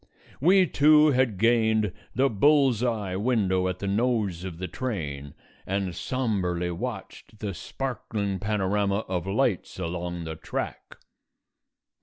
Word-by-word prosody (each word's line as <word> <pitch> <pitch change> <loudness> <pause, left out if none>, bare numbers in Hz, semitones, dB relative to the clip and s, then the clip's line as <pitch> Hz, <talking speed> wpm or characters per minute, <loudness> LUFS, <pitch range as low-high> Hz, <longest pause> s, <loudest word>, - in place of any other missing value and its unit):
We 185 +6 +5
two 150 -1 +5
had 130 -6 +1
gained 110 -2 +2 0.2
the 135 +2 +4
bull's 135 0 +3
eye 110 -7 -1
window 95 -4 +1
at 90 0 -2
the 100 - -4
nose 105 -4 0
of 90 -3 -6
the 90 +1 -4
train 75 - -5 0.3
and 95 -1 -1
sombrely 90 -7 -1
watched 110 +2 -7
the 105 -2 -4
sparkling 105 -4 -4
panorama 100 0 0
of 90 -1 -2
lights 105 -1 0
along 85 -1 -4
the 80 0 -5
track. 80 - -5
100 Hz, 125 wpm, -26 LUFS, 90-125 Hz, 0.3 s, We